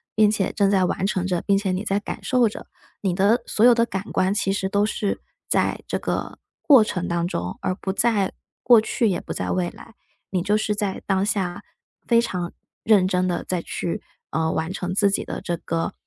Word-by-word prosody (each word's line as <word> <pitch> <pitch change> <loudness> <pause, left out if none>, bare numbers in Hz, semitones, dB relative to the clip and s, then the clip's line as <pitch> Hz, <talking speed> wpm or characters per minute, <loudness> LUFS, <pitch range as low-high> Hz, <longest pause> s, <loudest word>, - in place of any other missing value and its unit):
并 215 -1 +5
且 195 -3 -1
正 200 -2 +2
在 190 -2 +3
完 190 - -1
成 185 -3 -1
着， 180 -2 0
并 200 -1 +2
且 195 -1 -1
你 185 - -2
在 200 -1 0
感 - - -7
受 250 -3 +3
着。 210 - -7 0.3
你 190 -3 0
的 215 +5 +3
所 215 - +3
有 245 - +8
的 230 0 +3
感 195 -3 -4
官， 185 +1 +2
其 195 -1 0
实 190 -1 -1
都 205 0 +2
是 210 -2 -2 0.3
在 - - +1
这 - - -1
个 - - -3 0.2
过 270 -7 +7
程 180 -4 -3
当 170 0 0
中， 90 - -4
而 185 - 0
不 190 0 -3
在 205 -2 +1 0.3
过 240 -3 +7
去 220 0 0
也 180 - 0
不 - - -6
在 - - -3
未 180 -1 0
来。 230 - -15 0.3
你 185 -2 0
就 205 +1 +2
是 215 0 0
在 200 -2 -2
当 195 0 +2
下， 185 -4 -2 0.4
非 235 -1 +5
常 180 -6 -3 0.3
认 205 -4 +4
真 185 -1 +1
的， 175 - -1
在 180 -2 -2
去， 170 - -4 0.3
呃， 160 0 0
完 160 +2 -2
成 185 -1 -3
自 200 0 +4
己 - - -1
的 - - -5
这 175 - -2
个 165 0 -2
195 Hz, 235 characters per minute, -23 LUFS, 180-215 Hz, 0.4 s, 有